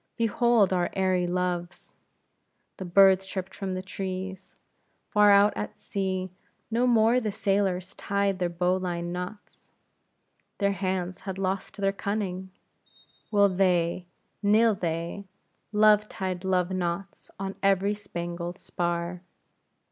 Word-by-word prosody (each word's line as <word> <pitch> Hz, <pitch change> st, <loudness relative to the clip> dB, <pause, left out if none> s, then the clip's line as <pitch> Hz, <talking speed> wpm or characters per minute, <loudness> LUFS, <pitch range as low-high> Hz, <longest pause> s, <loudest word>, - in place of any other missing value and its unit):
"Behold 230 Hz, -3 st, +3 dB
our 175 Hz, -1 st, +1 dB
airy 185 Hz, -2 st, +1 dB
loves," 180 Hz, 0 st, -3 dB, 0.8 s
the 190 Hz, -, -6 dB
birds 190 Hz, +1 st, +6 dB
chirped 190 Hz, 0 st, -5 dB
from 190 Hz, -2 st, -4 dB
the 185 Hz, -, -4 dB
trees; 190 Hz, 0 st, -6 dB, 0.5 s
far 210 Hz, -1 st, +6 dB
out 200 Hz, +1 st, +6 dB
at 210 Hz, -, -5 dB
sea, 185 Hz, -2 st, -3 dB, 0.4 s
no 240 Hz, +3 st, +2 dB
more 230 Hz, +1 st, +4 dB
the 220 Hz, -4 st, -2 dB
sailors 195 Hz, -3 st, 0 dB
tied 200 Hz, -1 st, -1 dB
their 175 Hz, -1 st, 0 dB
bowline 175 Hz, 0 st, -1 dB
knots; 180 Hz, +4 st, -7 dB, 0.9 s
their 200 Hz, -1 st, +2 dB
hands 185 Hz, -2 st, -2 dB
had 190 Hz, -1 st, -6 dB
lost 190 Hz, +1 st, -3 dB
their 195 Hz, -1 st, +1 dB
cunning; 195 Hz, -2 st, -3 dB, 0.8 s
will 205 Hz, -1 st, +5 dB
they, 180 Hz, -2 st, +1 dB, 0.3 s
nill 220 Hz, +2 st, +4 dB
they, 170 Hz, +1 st, -3 dB, 0.4 s
Love 210 Hz, 0 st, +4 dB
tied 185 Hz, -1 st, -4 dB
love 185 Hz, -1 st, +1 dB
knots 185 Hz, +1 st, -3 dB
on 195 Hz, 0 st, -4 dB
every 195 Hz, +1 st, +3 dB
spangled 175 Hz, -3 st, -5 dB
spar. 175 Hz, 0 st, -3 dB
190 Hz, 120 wpm, -27 LUFS, 180-200 Hz, 0.9 s, birds